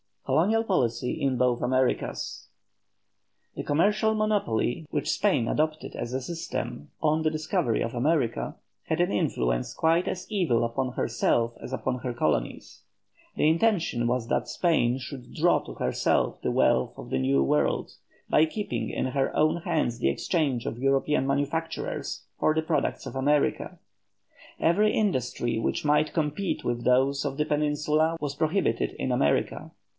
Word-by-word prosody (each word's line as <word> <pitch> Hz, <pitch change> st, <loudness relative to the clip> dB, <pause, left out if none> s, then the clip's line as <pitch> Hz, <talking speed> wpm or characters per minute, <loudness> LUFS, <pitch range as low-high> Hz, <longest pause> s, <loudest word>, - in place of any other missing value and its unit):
COLONIAL 185 Hz, +12 st, +2 dB
POLICY 125 Hz, -, 0 dB
IN 135 Hz, -2 st, +1 dB
BOTH 125 Hz, -1 st, +2 dB
AMERICAS. 130 Hz, -4 st, -1 dB, 1.1 s
The -, -, -4 dB
commercial 210 Hz, +8 st, +2 dB
monopoly 195 Hz, -, 0 dB
which 145 Hz, -, -2 dB
Spain 185 Hz, -, +2 dB
adopted 155 Hz, +3 st, -1 dB
as 120 Hz, -, -5 dB
a 130 Hz, -, -1 dB
system 145 Hz, -, -5 dB
on 155 Hz, 0 st, +2 dB
the 160 Hz, -, +2 dB
discovery 155 Hz, -, 0 dB
of 115 Hz, -, -2 dB
America, 125 Hz, -1 st, 0 dB, 0.3 s
had -, -, 0 dB
an -, -, +1 dB
influence -, -, 0 dB
quite 165 Hz, +2 st, +2 dB
as 185 Hz, 0 st, -3 dB
evil 170 Hz, -, +2 dB
upon 125 Hz, +2 st, -2 dB
herself 120 Hz, -1 st, +1 dB
as 130 Hz, -, -7 dB
upon 130 Hz, -1 st, -2 dB
her 125 Hz, -1 st, -3 dB
colonies. 75 Hz, -, -2 dB, 0.5 s
The -, -, +2 dB
intention 165 Hz, -, +1 dB
was 120 Hz, -1 st, -1 dB
that -, -, 0 dB
Spain 130 Hz, -8 st, +1 dB
should 130 Hz, -1 st, -9 dB
draw -, -, +3 dB
to -, -, -8 dB
herself -, -, 0 dB
the -, -, -1 dB
wealth 65 Hz, -, +2 dB
of -, -, -9 dB
the 65 Hz, -, 0 dB
New 70 Hz, +1 st, +2 dB
World, 75 Hz, +2 st, +1 dB, 0.4 s
by 155 Hz, -, +5 dB
keeping 205 Hz, +6 st, -3 dB
in -, -, -1 dB
her 135 Hz, +1 st, -1 dB
own 155 Hz, +2 st, +3 dB
hands 160 Hz, -9 st, -1 dB
the -, -, +2 dB
exchange 135 Hz, -, 0 dB
of 115 Hz, -, -4 dB
European 135 Hz, +1 st, +1 dB
manufactures 145 Hz, +4 st, -2 dB, 0.2 s
for 155 Hz, -, +2 dB
the 160 Hz, -, +1 dB
products 160 Hz, 0 st, -1 dB
of -, -, -7 dB
America. 145 Hz, +6 st, +1 dB, 0.8 s
Every 210 Hz, +6 st, +3 dB
industry 125 Hz, -, 0 dB
which 115 Hz, -, -1 dB
might 150 Hz, +1 st, +2 dB
compete 160 Hz, +4 st, -1 dB
with 120 Hz, 0 st, -2 dB
those 135 Hz, +2 st, +3 dB
of 135 Hz, -1 st, -3 dB
the 150 Hz, -, +1 dB
Peninsula 150 Hz, +2 st, +1 dB
was 145 Hz, -3 st, -3 dB
prohibited 155 Hz, -, 0 dB
in 130 Hz, -, -2 dB
America. 70 Hz, -13 st, 0 dB
140 Hz, 150 wpm, -27 LUFS, 120-160 Hz, 1.1 s, by